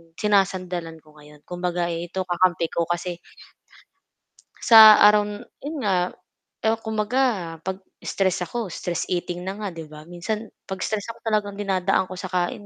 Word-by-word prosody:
sinasandalan 185 Hz, -5 st, -1 dB
ko 155 Hz, 0 st, -20 dB
ngayon 150 Hz, 0 st, -17 dB
kumbaga 175 Hz, -1 st, -2 dB
ito 175 Hz, +3 st, -4 dB
kakampi 175 Hz, -2 st, +1 dB
ko 170 Hz, -1 st, -1 dB
kasi 175 Hz, 0 st, -3 dB, 1.4 s
sa 220 Hz, -2 st, +9 dB
araw 210 Hz, 0 st, +7 dB
n 205 Hz, 0 st, -8 dB, 0.2 s
'yon 300 Hz, +2 st, -5 dB
nga, 190 Hz, -2 st, +2 dB, 0.7 s
eh, 225 Hz, +1 st, +3 dB
kumbaga 220 Hz, +4 st, -1 dB, 0.4 s
pag 190 Hz, +2 st, -4 dB, 0.2 s
stress 190 Hz, -1 st, 0 dB
ako, 200 Hz, +3 st, -4 dB
stress 175 Hz, -1 st, -3 dB
eating 180 Hz, 0 st, -3 dB
na 190 Hz, -, -3 dB
nga, 210 Hz, -, -3 dB
'di 165 Hz, -3 st, -8 dB
ba, 150 Hz, 0 st, -12 dB
minsan 210 Hz, +5 st, -4 dB, 0.2 s
'pag 190 Hz, -1 st, -6 dB
stress 215 Hz, -2 st, -2 dB
ako -, -, -21 dB
talagang 210 Hz, -2 st, -1 dB
dinadaan 190 Hz, -2 st, 0 dB
ko 185 Hz, -, -6 dB
sa -, -, -6 dB
kain 180 Hz, +3 st, -2 dB
185 Hz, 155 wpm, -23 LUFS, 175-210 Hz, 1.4 s, sa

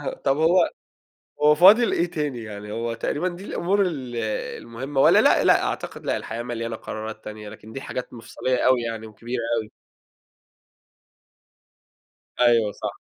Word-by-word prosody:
آه 145 Hz, -, -4 dB
طَب 135 Hz, -, +3 dB
هو 165 Hz, +3 st, +4 dB, 0.7 s
هو 150 Hz, 0 st, +6 dB
فاضِل 200 Hz, +9 st, +6 dB
إيه 175 Hz, 0 st, 0 dB
تاني 150 Hz, -8 st, -3 dB
يعني؟ 105 Hz, -1 st, -8 dB
هو 115 Hz, +1 st, -3 dB
تقريبًا 145 Hz, +9 st, -2 dB
دي 180 Hz, +2 st, -8 dB
الأمور 200 Hz, +1 st, 0 dB
ال 135 Hz, -10 st, -3 dB, 0.4 s
المهمة 135 Hz, +4 st, -4 dB
والّا -, -, +6 dB
لأ، -, -, +4 dB
لأ، -, -, +5 dB
أعتقد -, -, -5 dB
لأ، -, -, +1 dB
الحياة 115 Hz, +1 st, -5 dB
مليانة 115 Hz, -1 st, -4 dB
قرارات 110 Hz, 0 st, -7 dB
تانية 105 Hz, 0 st, -8 dB
لكن 110 Hz, +1 st, -12 dB
دي 135 Hz, -, -6 dB
حاجات 125 Hz, -1 st, -6 dB
مفصليّة 125 Hz, +2 st, -2 dB
أوي 130 Hz, -2 st, +4 dB
يعني 115 Hz, -1 st, -5 dB
وكبيرة 115 Hz, +3 st, -5 dB, 0.2 s
أوي. 110 Hz, -1 st, -6 dB, 2.7 s
أيوه 115 Hz, -4 st, +4 dB
صح. -, -, -5 dB
120 Hz, 150 wpm, -24 LUFS, 115-150 Hz, 2.7 s, هو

